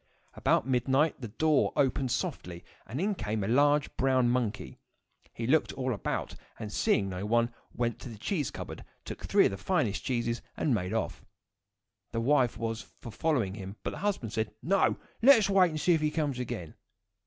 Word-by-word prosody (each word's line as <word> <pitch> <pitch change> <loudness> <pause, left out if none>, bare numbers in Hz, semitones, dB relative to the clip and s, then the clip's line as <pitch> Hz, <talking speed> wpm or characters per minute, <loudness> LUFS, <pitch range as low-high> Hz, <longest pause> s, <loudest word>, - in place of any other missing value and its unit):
About - - +2
midnight 135 +4 +2
the 120 - -4
door 155 +7 +2
opened 135 -1 +1
softly, 85 -6 -3 0.2
and 130 - -4
in 205 +4 +1
came 110 - -2
a - - -2
large 145 +4 +3
brown 130 -2 +3
monkey. 120 -4 -2 0.5
He 115 - -5
looked 145 +5 +2
all 130 -2 -1
about, 100 - -3 0.2
and 105 -2 -6
seeing 100 - +2
no 95 0 -4
one, 115 +2 +2
he - - -28 0.2
went 120 -1 -1
to - - -8
the 110 - -9
cheese 145 - -1
cupboard, - - -7 0.2
took - - -7
three - - +4
of - - +2
the 95 - -5
finest 100 +2 0
cheeses, 120 -2 -1 0.2
and 145 - +1
made 95 -4 -1
off. 115 - -2 0.9
The 115 - 0
wife 125 0 +2
was 115 0 -3 0.2
for 115 - -8
following 120 -7 0
him, 100 -1 -7
but - - -2
the - - -7
husband 185 - -2
said, 110 -1 -1
"No! 195 +3 +2 0.2
let 270 +2 +9
us 200 -3 +1
wait 185 -2 +5
and 155 -1 -4
see 175 - +3
if 160 - +1
he 155 - +2
comes 150 -4 -1
again." 90 -10 -5
125 Hz, 195 wpm, -30 LUFS, 110-150 Hz, 0.9 s, let